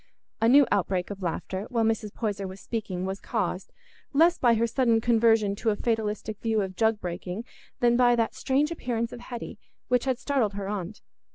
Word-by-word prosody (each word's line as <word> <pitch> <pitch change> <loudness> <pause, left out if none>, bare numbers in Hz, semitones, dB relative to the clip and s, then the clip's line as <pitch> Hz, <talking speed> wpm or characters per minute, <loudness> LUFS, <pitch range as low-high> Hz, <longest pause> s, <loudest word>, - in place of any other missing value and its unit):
A 225 - +4
new 280 +2 +7
outbreak 190 -2 0
of 200 -1 -7
laughter, 185 +3 -3
while 235 -3 +1
Mrs. 220 -1 0
Poyser 205 -3 -3
was 190 +1 -9
speaking, 190 -6 -4
was 190 +1 -3
caused, 190 -4 -3 0.4
less 335 +5 +4
by 240 -2 +4
her 225 +1 +2
sudden 235 -1 +2
conversion 225 -3 +3
to 225 - 0
a 210 - +2
fatalistic 215 -1 -2
view 220 -2 +1
of 190 -1 -4
jug 220 0 +2
breaking 180 +3 -5 0.4
than 240 -1 +4
by 245 -1 +5
that 230 -1 0
strange 285 +4 0
appearance 235 -7 -2
of - - -8
Hetty, 240 -1 -7 0.3
which 250 0 +2
had 260 -2 +1
startled 255 -7 0
her 200 -1 -4
aunt. 200 0 -5
225 Hz, 190 wpm, -27 LUFS, 200-240 Hz, 0.4 s, new